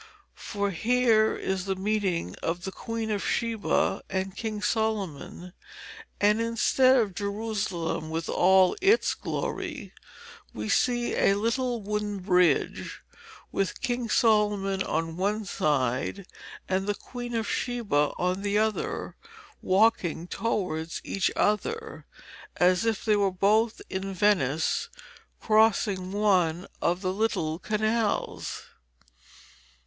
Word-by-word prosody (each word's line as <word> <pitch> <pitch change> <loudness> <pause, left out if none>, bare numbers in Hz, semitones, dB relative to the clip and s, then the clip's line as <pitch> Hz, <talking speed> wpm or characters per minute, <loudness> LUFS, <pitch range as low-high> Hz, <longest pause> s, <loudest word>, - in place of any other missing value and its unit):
For 200 -1 -2
here 225 +2 +3
is 190 -1 -2
the 195 -1 -1
meeting 190 - -1
of 170 +1 -2
the 190 - -4
Queen 225 +1 -4
of 205 -2 -1
Sheba 230 -2 0
and 190 0 -3
King 220 -2 -4
Solomon, 200 -6 -2 0.7
and 210 +2 +3
instead 245 +3 +3
of 215 -6 +1
Jerusalem 200 -5 -3
with 165 +1 -3
all 185 0 +4
its 405 +5 +4
glory, 305 - -4 0.6
we 110 0 -4
see 240 -1 +1
a 195 - +3
little 235 +2 -1
wooden 210 0 -2
bridge, 180 -5 +1 0.5
with 195 -3 -2
King 245 -2 -2
Solomon 210 -4 +2
on 165 -1 -2
one 205 +3 -1
side 145 +2 -1 0.4
and 190 +1 -1
the 205 - 0
Queen 245 +1 -7
of 225 -1 -1
Sheba 215 - 0
on 180 +2 -1
the 205 0 0
other, 220 0 -1 0.5
walking 185 -4 +2
towards 180 -7 -2
each 195 - 0
other, 450 - -1 0.5
as 180 +4 +3
if 225 -3 -1
they 215 -2 +4
were 200 -1 +2
both 210 +5 +1
in 190 +1 -4
Venice 165 -7 +1 0.5
crossing 215 -4 +2
one 185 -4 +2 0.2
of 175 +2 +1
the 185 -1 -1
little 180 -7 -1
canals. 215 +2 -1
205 Hz, 115 wpm, -27 LUFS, 185-220 Hz, 0.7 s, all